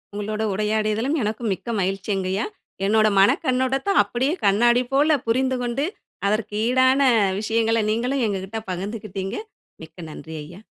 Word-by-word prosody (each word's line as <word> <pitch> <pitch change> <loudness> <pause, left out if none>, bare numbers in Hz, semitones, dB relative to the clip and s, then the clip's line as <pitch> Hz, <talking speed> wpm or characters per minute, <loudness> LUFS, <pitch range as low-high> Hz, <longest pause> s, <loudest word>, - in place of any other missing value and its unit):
உங்களோட 210 +1 -3
உரையாடியதலும் 215 +6 0
எனக்கும் 215 +1 -2
மிக்க 190 - -8
மகிழ்ச்சிங்கயா. 195 +1 -1 0.4
என்னுட 215 +1 +4
மனக் 195 - +4
கண்ணோட்டத்த, 260 +6 +1
அப்படியே 260 +5 -1
கண்ணாடி 240 +5 +4
போல 295 +2 +4
புரிந்துகொண்டு, 255 +2 0 0.4
அதற்கு 210 0 -1
ஈடான 260 +2 +4 0.4
விஷயங்களை 225 +1 +1
நீங்களும் 250 +4 0
எங்கக்கிட்ட 195 +2 -3
பகிர்ந்துகிட்டீங்க. 195 0 -5 0.5
மிக்க 160 +1 -14
நன்றி 160 +1 -9
ஐயா. 175 +6 -12
220 Hz, 115 wpm, -23 LUFS, 200-250 Hz, 0.5 s, என்னுட